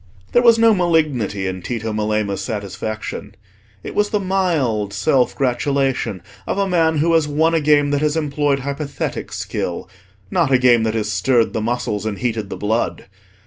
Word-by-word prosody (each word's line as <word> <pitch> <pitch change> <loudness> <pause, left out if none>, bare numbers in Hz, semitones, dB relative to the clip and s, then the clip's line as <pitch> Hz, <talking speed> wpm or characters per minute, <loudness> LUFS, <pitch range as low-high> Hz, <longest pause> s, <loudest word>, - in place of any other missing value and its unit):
There 240 - +4
was 235 -2 +6
no 230 -1 +5
malignity 155 - +1
in 95 0 -3
Tito 110 +1 -4
Melema's 105 -2 -1
satisfaction: 110 +1 -5 0.5
it - - -6
was 210 0 +1
the 210 - 0
mild 160 - 0
self 125 +6 +1
gratulation 135 -6 -1 0.2
of - - -2
a 200 -1 +1
man 165 -3 +2
who 165 +3 +2
has 160 -2 +3
won 160 +3 +2
a 165 - +2
game 145 -1 +3
that 145 0 0
has 150 +1 +1
employed 145 -2 0
hypothetic 140 +1 -4
skill, - - -4 0.4
not 165 -6 +1
a 130 - +6
game 125 -2 +4
that 110 0 -1
has 105 -1 -1
stirred 115 +4 +2
the 110 - -1
muscles 110 -2 -2
and 105 -2 -3
heated 110 -4 -2
the - - -5
blood. 110 +3 -1
135 Hz, 175 wpm, -19 LUFS, 110-160 Hz, 0.5 s, was